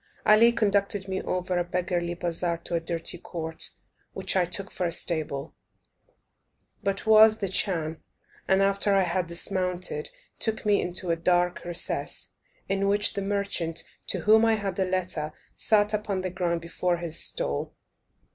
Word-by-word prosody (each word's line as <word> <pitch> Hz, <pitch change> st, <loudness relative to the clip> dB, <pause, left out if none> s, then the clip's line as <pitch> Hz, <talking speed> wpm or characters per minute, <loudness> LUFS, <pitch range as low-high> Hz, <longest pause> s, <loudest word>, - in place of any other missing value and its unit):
Ali 220 Hz, +3 st, +6 dB
conducted 200 Hz, -3 st, +1 dB
me 190 Hz, 0 st, -2 dB
over 180 Hz, 0 st, -2 dB
a -, -, +1 dB
beggarly 175 Hz, -1 st, -2 dB
bazaar 170 Hz, 0 st, -2 dB
to -, -, -7 dB
a 170 Hz, -, +2 dB
dirty 165 Hz, +1 st, -2 dB
court, 160 Hz, -2 st, -1 dB, 0.4 s
which -, -, 0 dB
I 185 Hz, -2 st, +3 dB
took 190 Hz, +2 st, -2 dB
for 180 Hz, -, -2 dB
a -, -, -3 dB
stable, 155 Hz, -4 st, -3 dB, 1.3 s
but 195 Hz, 0 st, -2 dB
was 220 Hz, 0 st, +7 dB
the 200 Hz, -, -2 dB
chan; 165 Hz, -4 st, 0 dB, 0.5 s
and, 190 Hz, 0 st, +3 dB
after 200 Hz, +1 st, +2 dB
I 195 Hz, -, +4 dB
had 180 Hz, 0 st, -1 dB
dismounted, 180 Hz, -2 st, -1 dB, 0.3 s
took 220 Hz, -1 st, +1 dB
me 205 Hz, -1 st, +3 dB
into 180 Hz, 0 st, -2 dB
a -, -, +2 dB
dark 175 Hz, +1 st, +1 dB
recess, 175 Hz, 0 st, 0 dB, 0.3 s
in 195 Hz, 0 st, 0 dB
which 205 Hz, +1 st, +3 dB
the 200 Hz, -, -3 dB
merchant, 195 Hz, -5 st, -1 dB, 0.2 s
to -, -, -2 dB
whom 220 Hz, +1 st, +5 dB
I 225 Hz, -1 st, +4 dB
had 200 Hz, -3 st, -4 dB
a 190 Hz, -, +2 dB
letter, 180 Hz, -5 st, -2 dB, 0.2 s
sat 210 Hz, -1 st, +2 dB
upon 205 Hz, -3 st, -1 dB
the 185 Hz, -1 st, -3 dB
ground 170 Hz, -2 st, -1 dB
before 175 Hz, +1 st, -1 dB
his 170 Hz, -2 st, 0 dB
stall. 70 Hz, +1 st, 0 dB
185 Hz, 160 wpm, -26 LUFS, 170-200 Hz, 1.3 s, was